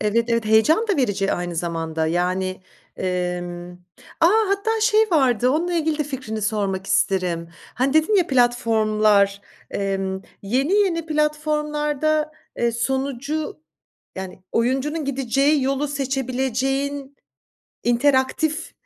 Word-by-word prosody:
Evet, 215 +2 +1
evet, 230 -1 +1
heyecan 220 - +4
da 400 - +2
verici 205 -7 +1
aynı 175 -1 -3
zamanda, 165 -1 -2
yani, 185 +2 -1 0.3
emm 180 -1 -3 0.5
A, 330 - +6 0.2
hatta 440 +3 0
şey 430 0 +4
vardı, 255 -6 +3
onunla 340 +5 0
ilgili 315 -2 0
de 300 - 0
fikrini 250 -6 -5
sormak 195 -3 -1
isterim. 185 -3 0 0.3
Hani, 265 +2 +1
dedin 315 +7 +3
ya 365 -4 +4
platformlar, 215 -5 +2 0.3
emm, 195 -1 -2 0.2
yeni 260 - 0
yeni 370 -6 +2
platformlarda, 300 0 0 0.2
eee, 235 0 +1
sonucu, 265 - -2 0.6
yani, 190 -1 -7
oyuncunun 270 +6 0
gideceği 275 +2 +1
yolu 275 +2 0
seçebileceğin 270 +1 -2 0.7
interaktif 265 +5 +1
255 Hz, 110 wpm, -22 LUFS, 195-300 Hz, 0.7 s, A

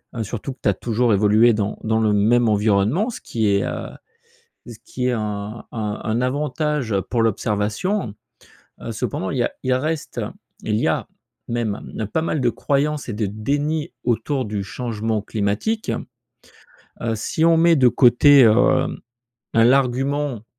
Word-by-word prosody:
heu, 115 - -2
surtout 120 +5 -5
que 130 - -27
tu - - +3
as 100 - +3
toujours 115 +1 0
évolué 105 +4 +4
dans 105 -1 -2
dans 110 0 +1
le 110 -1 +2
même 115 +4 +3
environnement, 105 - +2
ce - - -7
qui 110 -2 -1
est, 100 -1 +2
heu, - - -4 0.8
ce 120 -2 -9
qui 125 0 -3
est - - +2
un 105 0 -4
un 105 -2 -4
un 110 +3 -1
avantage 145 -2 -1
pour 120 -2 +1
l'observation. 110 - -1 0.7
Heu, 115 - -5
cependant, 110 -4 -3
il - - -3
y 120 - +2
a - - -1
il 130 -1 +1
reste 155 +4 -2 0.4
il 105 -1 0
y - - +1
a - - -1 0.4
même 110 -2 -3
pas 160 - +1
mal 160 -2 -1
de 120 - +3
croyances 145 0 -1
et - - -3
de 105 +1 -1
déni 145 - -2
autour 130 +2 0
du 105 -1 -3
changement 110 0 -3
climatique. 105 - -2 1.1
Heu, 115 -1 -1
si 155 +9 -1
on 165 -1 +5
met 170 0 +5
de 130 -4 +5
côté, 135 +2 +6
heu, 110 - +6 1.0
hein 115 - +5
l'argument 135 -1 +1
120 Hz, 165 wpm, -21 LUFS, 105-140 Hz, 1.1 s, côté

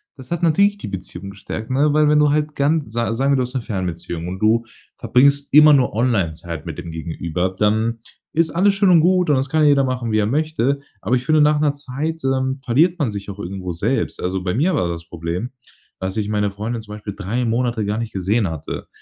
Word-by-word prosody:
Das 130 +2 -13
hat 170 - -1
natürlich 200 +5 +3
die - - -6
Beziehung 95 0 -7
gestärkt, 105 +3 -7
ne? 145 +3 +2
Weil 150 0 +4
wenn 150 - +4
du 150 -1 +4
halt 150 0 0
ganz 145 -3 0
sa 115 0 -1
sagen 135 +4 +1
wir, - - +4
du 130 - +1
hast 125 - -6
'ne 130 - -1
Fernbeziehung 85 -5 -4
und 95 +1 -5
du 110 +3 +3 0.3
verbringst 140 +4 +2
immer 150 0 +8
nur 130 -6 +3
online 110 -8 +1
Zeit 80 -1 -7
mit 85 0 -6
dem 85 - -7
Gegenüber, 85 +2 -3
dann 110 +2 +1 0.3
ist 160 0 +2
alles 195 +5 +3
schön 195 -1 +3
und 175 -3 +7
gut 180 -1 +3
und 145 - +4
das 130 +1 0
kann 155 0 +2
jeder 140 -1 +4
machen 125 -3 -2
wie 110 - +2
er 105 - +2
möchte. 140 +1 0 0.2
Aber 115 +6 +1
ich 125 - -1
finde, 155 +2 +4
nach 150 0 +4
'ner 145 -1 +1
Zeit, 145 +3 -4
ähm, 130 0 0
verliert 160 +8 +3
man 140 -10 0
sich 100 0 -6
auch 100 - -7
irgendwo 95 -2 -5
selbst. 85 - -1
Also, 95 +1 -1
bei 90 +2 -1
mir 170 +8 +2
war 90 - 0
das 85 0 -5
Problem, 85 +7 -4 0.5
dass 95 +3 -3
ich 105 - -1
meine 105 -1 0
Freundin 110 +4 -4
zum 105 -1 -9
Beispiel 105 -1 -7
3 115 +5 -2
Monate 115 -1 0
gar 105 +1 -1
nicht 115 -1 -4
gesehen 100 +3 0
hatte. 80 -3 -6
120 Hz, 235 wpm, -20 LUFS, 100-145 Hz, 0.5 s, immer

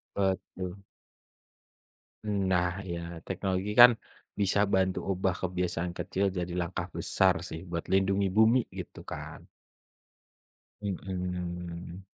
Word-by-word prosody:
Betul. 95 -1 -2 1.5
Nah, 95 -3 +2 0.2
iya, 85 -1 -3 0.3
teknologi 95 +1 -1
kan 120 0 +12 0.5
bisa 100 0 +2 0.2
bantu 95 -1 +2
ubah 95 -1 0
kebiasaan 90 -1 -1
kecil 95 - -1
jadi 90 0 -2
langkah 85 +1 -2
besar - - +3
sih 80 - -6
buat 85 -1 -2
lindungi 95 +1 +3
bumi 110 +3 +6 0.2
gitu - - -7
kan. - - -7 1.4
Mhm. 90 -2 -4
95 Hz, 100 wpm, -30 LUFS, 90-95 Hz, 1.5 s, kan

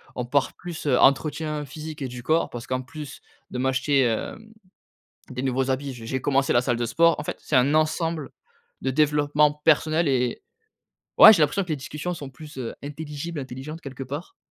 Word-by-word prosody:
on 125 - -3
parle 140 +3 +1
plus 170 -3 -7
entretien 150 +2 +2
physique 155 +2 -8
et 135 - -2
du 125 0 -8
corps, 160 +4 +1
parce 120 -1 -8
qu'en 130 0 -1
plus 145 +2 -9 0.3
de - - -4
m'acheter, 130 +2 +2
hem, 130 - -2 0.8
des 125 -1 -4
nouveaux 130 0 0
habits, 135 0 -2
je 115 -2 -10
j'ai 130 +3 -2
commencé 135 0 +2
la 120 - +4
salle 120 -2 0
de 120 - -1
sport. 165 +6 +4
En 150 - -3
fait, - - -4
c'est 150 - 0
un 130 +3 +4
ensemble 155 -1 0 0.5
de 130 - 0
développement 150 +1 +3
personnel 160 +1 +3
et 125 -2 0 0.8
et - - +4
ouais, 220 - +13
j'ai 175 -7 +3
l'impression 195 +6 +2
que 180 - -9
les 155 - -1
discussions 150 +5 -5
sont 140 -5 -8
plus 145 +1 -12 0.2
intelligibles, 150 +2 -6
intelligentes, 135 +4 -7
quelque 135 -1 -7
part 145 - -7
145 Hz, 190 wpm, -24 LUFS, 130-155 Hz, 0.8 s, ouais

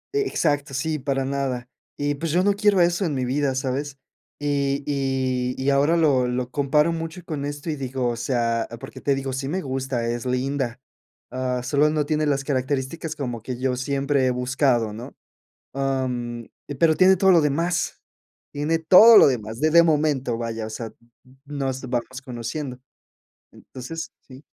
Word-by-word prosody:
E 420 - +3
exacto. 145 -3 -1
Sí, 155 +3 -1
para 135 0 -1
nada. 135 -3 -2 0.3
Y 145 0 0
pues 155 +2 -3
yo 180 +2 +2
no 205 +1 +3
quiero 205 -1 +3
eso 175 +3 +2
en 155 -4 -1
mi 130 -1 -1
vida, 135 +1 0
¿sabes?, 135 +1 -3 0.4
y 140 -1 0
y 130 -3 -1
y 135 +2 0
ahora 145 +4 +3
lo 140 -6 +3
lo 125 0 -2
comparo 150 +4 +2
mucho 165 +1 -5
con 145 -4 -4
esto 145 +2 -5
y 155 - -1
digo 130 -2 -2
o 120 - -2
sea, 115 -1 -1
porque 135 - -10
te 140 - +1
digo, 135 0 -3
sí, 135 +1 -3
me 185 +5 -2
gusta, 130 -3 -3
es 120 0 -3
linda. 130 -1 -2 0.5
Ah, 125 -1 -2
solo 145 +4 +2
no 150 -1 0
tiene 155 0 0
las 140 -1 0
características 140 +3 -2
como 120 -6 -4
que 125 +2 -5
yo 130 0 0
siempre 140 +1 0
he 125 - +2
buscado, 125 -2 +1
¿no? 115 +3 -9 0.6
Am, 125 -4 -2 0.3
pero 160 0 +4
tiene 190 +2 +6
todo 190 +1 +4
lo 170 - +6
demás. 165 +4 -1 0.5
Tiene 150 +3 0
todo 195 +8 +8
lo - - +8
demás 115 -4 -2
de 155 0 +3
de 170 +1 +7
momento, 145 -7 +1
vaya, 115 -1 -4
o 110 - -7
sea, 115 +1 -5
n - - -11 0.3
n 130 +1 -21
nos 135 -2 -3
vamos 130 +1 -4
conociendo. 125 +1 -5 0.7
Entonces 160 +6 -8
sí. 130 +2 -14
135 Hz, 180 wpm, -23 LUFS, 125-150 Hz, 0.7 s, todo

